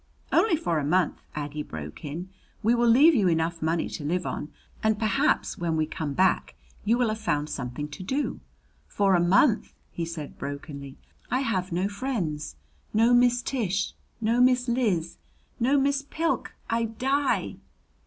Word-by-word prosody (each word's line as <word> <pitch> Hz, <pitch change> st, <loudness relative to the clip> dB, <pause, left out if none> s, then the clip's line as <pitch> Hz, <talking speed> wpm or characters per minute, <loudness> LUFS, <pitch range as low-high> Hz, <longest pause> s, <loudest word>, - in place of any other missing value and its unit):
"Only 405 Hz, -7 st, +4 dB
for 170 Hz, -, 0 dB
a -, -, -2 dB
month," 175 Hz, +3 st, +1 dB
Aggie 150 Hz, 0 st, -4 dB
broke 75 Hz, -, -8 dB
in. 165 Hz, +6 st, -5 dB, 0.3 s
"We 225 Hz, +3 st, +4 dB
will 240 Hz, 0 st, +3 dB
leave 280 Hz, +8 st, +7 dB
you 210 Hz, -9 st, +3 dB
enough 165 Hz, 0 st, 0 dB
money 160 Hz, +1 st, 0 dB
to -, -, -6 dB
live 175 Hz, +4 st, -1 dB
on; 150 Hz, -, -4 dB, 0.3 s
and 220 Hz, -1 st, +2 dB
perhaps 230 Hz, +7 st, +1 dB
when 165 Hz, -2 st, 0 dB
we 155 Hz, -, +2 dB
come 155 Hz, -2 st, -4 dB
back 185 Hz, +4 st, +2 dB, 0.3 s
you 225 Hz, +3 st, +3 dB
will 245 Hz, -2 st, +2 dB
have 215 Hz, 0 st, -2 dB
found 150 Hz, -7 st, -1 dB
something 130 Hz, +3 st, -4 dB
to 145 Hz, -, -9 dB
do 265 Hz, +10 st, -2 dB, 0.3 s
" -, -, -37 dB
"For 200 Hz, -2 st, +2 dB
a 175 Hz, -, +5 dB
month," 205 Hz, +7 st, +3 dB, 0.2 s
he 170 Hz, -, -3 dB
said 165 Hz, -3 st, -7 dB
brokenly. 140 Hz, -1 st, -7 dB, 0.3 s
"I 255 Hz, -, +1 dB
have 190 Hz, -8 st, -1 dB
no 180 Hz, +3 st, 0 dB
friends, 200 Hz, -, -3 dB, 0.4 s
no 230 Hz, +3 st, +5 dB
Miss 245 Hz, 0 st, +4 dB
Tish, 200 Hz, -7 st, -1 dB, 0.3 s
no 230 Hz, +2 st, +2 dB
Miss 250 Hz, 0 st, +4 dB
Liz, 210 Hz, -9 st, 0 dB, 0.4 s
no 265 Hz, +4 st, +3 dB
Miss 275 Hz, 0 st, +2 dB
Pilk. 325 Hz, +4 st, -2 dB
I 230 Hz, 0 st, +1 dB
die!" 270 Hz, +5 st, 0 dB
195 Hz, 170 wpm, -27 LUFS, 160-245 Hz, 0.4 s, leave